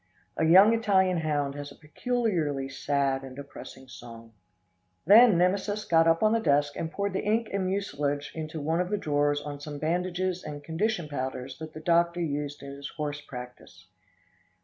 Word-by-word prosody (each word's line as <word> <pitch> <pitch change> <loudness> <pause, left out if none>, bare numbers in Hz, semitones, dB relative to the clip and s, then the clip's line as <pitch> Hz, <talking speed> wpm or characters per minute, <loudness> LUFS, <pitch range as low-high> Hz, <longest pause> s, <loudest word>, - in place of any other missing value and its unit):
A 160 - +1
young 190 +7 +7
Italian 190 -5 +2
hound 145 -3 -1
has 145 0 -7
a - - -13
peculiarly 160 - -2
sad 135 0 -1
and 135 -1 -10
depressing 140 -1 -11
song. 115 -2 -12 0.7
Then 215 +1 +7
Nemesis 200 +4 0
got 165 -4 +4
up 165 +2 +3
on 215 +1 +4
the 230 - +2
desk 145 -6 +2
and 160 - -4
poured 200 +1 -2
the 190 - -1
ink 220 +2 0
and 195 -2 0
mucilage 145 -7 -2
into 155 0 -5
one 160 +4 0
of 180 - -3
the 210 - 0
drawers 145 -4 0
on 145 -1 -6
some 145 0 -7
bandages 180 +3 -1
and 145 -1 -7
condition 170 +2 -1
powders 130 -2 -5
that 160 0 -8
the 155 - -9
doctor 170 +1 +2
used 145 -3 -3
in 140 - -7
his 140 0 -8
horse 150 -1 -3
practice. 125 -3 -11
155 Hz, 175 wpm, -27 LUFS, 145-185 Hz, 0.7 s, young